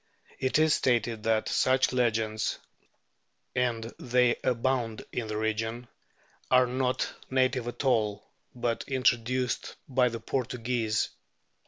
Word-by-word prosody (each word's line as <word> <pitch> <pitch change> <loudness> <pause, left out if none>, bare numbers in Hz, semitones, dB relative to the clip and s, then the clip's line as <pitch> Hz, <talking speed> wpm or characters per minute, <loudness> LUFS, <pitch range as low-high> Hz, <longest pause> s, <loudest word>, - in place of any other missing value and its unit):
It 130 +2 +2
is 155 0 +4
stated 120 -3 +1
that 110 -1 +2
such 130 0 +2
legends, 110 -3 0 1.0
and 120 -3 0 0.2
they 125 -1 +3
abound 120 -2 0
in 120 -3 -3
the 105 0 -3
region, 110 +2 -2 0.6
are 130 0 +6
not 125 +1 -1 0.2
native 130 -2 +1
at 120 +3 -4
all, 105 -5 +1 0.3
but 120 -2 -1
introduced 125 -1 0
by 125 -2 +3
the 115 0 -5
Portuguese. 115 -3 -1
120 Hz, 115 wpm, -29 LUFS, 115-130 Hz, 1.0 s, are